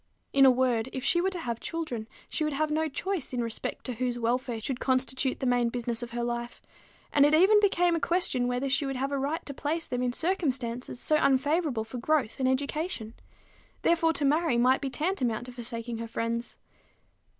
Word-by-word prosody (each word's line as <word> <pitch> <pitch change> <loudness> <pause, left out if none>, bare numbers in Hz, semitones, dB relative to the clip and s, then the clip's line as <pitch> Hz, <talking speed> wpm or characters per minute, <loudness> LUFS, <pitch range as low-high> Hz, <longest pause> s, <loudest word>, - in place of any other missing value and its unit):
In 275 -1 +7
a - - +9
word, 250 -2 +2
if 260 - -4
she 345 +3 +3
were 380 - +2
to 375 - -5
have 235 -6 -3
children, 285 -10 -4 0.2
she 315 - -2
would 305 -1 0
have 305 +2 0
no 315 +1 +1
choice 365 -1 -3
in 245 -1 0
respect 230 -1 -4
to 255 - -3
whose 245 +1 -2
welfare 240 0 -1
should 250 +3 -4
constitute 260 0 0
the - - -2
main 245 -1 +2
business 235 -1 -3
of 240 - -5
her 235 0 -3
life; 240 0 -3 0.5
and 285 - +6
it 295 +2 +5
even 390 +6 +6
became 355 -4 +3
a - - 0
question 320 -8 +1
whether 250 +2 -1
she 275 +2 +2
would 270 - -3
have 270 +2 -2
a 280 - 0
right 290 +5 -2
to 280 - -6
place 310 +4 -2
them 245 0 -3
in 250 -1 +1
circumstances 255 -8 -2
so 305 - +3
unfavorable 285 -2 +2
for 225 +3 -7
growth 280 -3 0
and 260 -1 +2
education. 280 -3 -2 0.7
Therefore, 330 -1 +3
to 290 -1 0
marry 305 -2 +2
might 255 +3 +4
be 275 - -2
tantamount 260 - -1
to 250 - -8
forsaking 235 -1 -5
her 230 - -4
friends. 230 +1 -3
260 Hz, 205 wpm, -28 LUFS, 240-310 Hz, 0.7 s, a